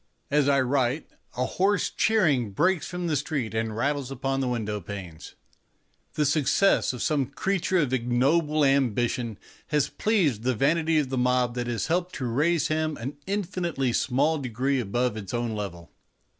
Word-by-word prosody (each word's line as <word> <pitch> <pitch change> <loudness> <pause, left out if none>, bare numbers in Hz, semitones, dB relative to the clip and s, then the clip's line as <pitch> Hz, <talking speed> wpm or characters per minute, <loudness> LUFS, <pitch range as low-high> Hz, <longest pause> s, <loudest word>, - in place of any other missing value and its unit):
As 145 -1 +3
I 140 -1 +4
write 130 +2 0 0.3
a 125 - +1
hoarse 195 +7 +1
cheering 145 - +2
breaks 180 - +1
from 180 -1 -4
the 160 -3 0
street 140 -5 -2
and 110 -1 -2
rattles 140 0 -1
upon 135 0 -2
the 130 - 0
window 105 -4 -2
panes. 90 -4 -8 0.8
The 150 - +1
success 155 +7 +3
of 125 -3 -5
some 145 -4 +1
creature 190 +5 -1
of 145 -7 +1
ignoble 140 +5 +2
ambitions 120 -4 +1 0.3
has 150 -2 +1
pleased 175 - +1
the 125 +1 0
vanity 160 +5 +2
of 145 -4 +1
the 130 -1 -1
mob 125 -1 +2
that 120 0 -3
has 120 -1 -2
helped 175 +2 -1
to 130 - -3
raise 150 +7 +1
him 155 -1 -1
an 135 +5 -6
infinitely 175 - -1
small 145 +6 +1
degree 130 +2 -1
above 120 +1 -1
its 105 0 -5
own 120 -1 -1
level. 90 -5 -6
135 Hz, 165 wpm, -26 LUFS, 120-155 Hz, 0.8 s, I